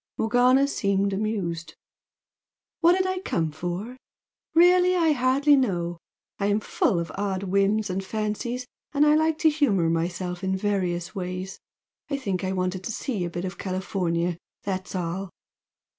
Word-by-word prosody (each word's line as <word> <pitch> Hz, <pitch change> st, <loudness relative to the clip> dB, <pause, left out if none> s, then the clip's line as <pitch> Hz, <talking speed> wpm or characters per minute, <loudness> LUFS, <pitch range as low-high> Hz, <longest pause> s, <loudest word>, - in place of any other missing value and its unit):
Morgana 250 Hz, +5 st, +4 dB
seemed 200 Hz, -6 st, 0 dB
amused. 180 Hz, -6 st, -2 dB, 1.0 s
"What 345 Hz, +1 st, +6 dB
did 375 Hz, -, +1 dB
I 375 Hz, 0 st, -1 dB
come 165 Hz, -, -1 dB
for? 175 Hz, +10 st, -5 dB, 0.6 s
Really, 360 Hz, +2 st, +6 dB
I 330 Hz, -3 st, +3 dB
hardly 275 Hz, +2 st, +4 dB
know! 175 Hz, -10 st, 0 dB, 0.4 s
I 200 Hz, -, +1 dB
am 205 Hz, +1 st, +2 dB
full 200 Hz, -, +1 dB
of 170 Hz, -, -4 dB
odd 195 Hz, -1 st, -2 dB
whims 200 Hz, +3 st, +2 dB
and 190 Hz, 0 st, -2 dB
fancies, 220 Hz, +5 st, -3 dB, 0.3 s
and 295 Hz, 0 st, +4 dB
I 300 Hz, -, +5 dB
like 315 Hz, 0 st, +2 dB
to 315 Hz, 0 st, +4 dB
humour 200 Hz, -, +2 dB
myself 175 Hz, +2 st, -2 dB
in 190 Hz, 0 st, 0 dB
my -, -, 0 dB
various 185 Hz, -4 st, -1 dB
ways. 185 Hz, 0 st, -5 dB, 0.5 s
I 280 Hz, -, -1 dB
think 195 Hz, -9 st, -2 dB
I 190 Hz, -, -1 dB
wanted 185 Hz, 0 st, -2 dB
to -, -, -2 dB
see 215 Hz, -5 st, -2 dB
a -, -, -3 dB
bit 175 Hz, +2 st, -4 dB
of 185 Hz, +1 st, -6 dB
California, 180 Hz, -2 st, -1 dB, 0.2 s
that's 190 Hz, -1 st, -4 dB
all!" 180 Hz, +2 st, -3 dB
195 Hz, 160 wpm, -25 LUFS, 180-255 Hz, 1.0 s, What